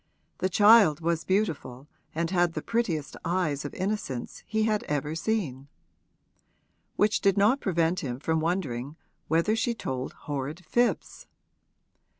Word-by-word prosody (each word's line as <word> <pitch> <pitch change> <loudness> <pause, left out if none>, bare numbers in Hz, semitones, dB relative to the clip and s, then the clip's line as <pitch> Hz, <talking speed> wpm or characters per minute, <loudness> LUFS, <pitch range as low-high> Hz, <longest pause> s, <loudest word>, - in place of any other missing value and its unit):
The 185 - 0
child 205 -5 +6
was 165 -1 -1
beautiful 160 -10 -1 0.3
and 165 +1 -1
had 175 -2 +2
the 155 - -4
prettiest 180 -11 -1
eyes 170 -5 0
of 145 - -5
innocence 185 - -4
he 220 0 0
had 215 -1 +1
ever 150 +1 -2
seen: 160 - -2 1.3
which 210 0 +2
did 195 -1 +3
not 215 +7 +4
prevent 170 -1 +1
him 130 -8 -4
from 160 +2 0
wondering 155 -6 -2 0.3
whether 170 +7 +2
she 230 +1 0
told 130 - -4
horrid 145 +4 -5
fibs. 240 +7 0
170 Hz, 135 wpm, -27 LUFS, 145-205 Hz, 1.3 s, child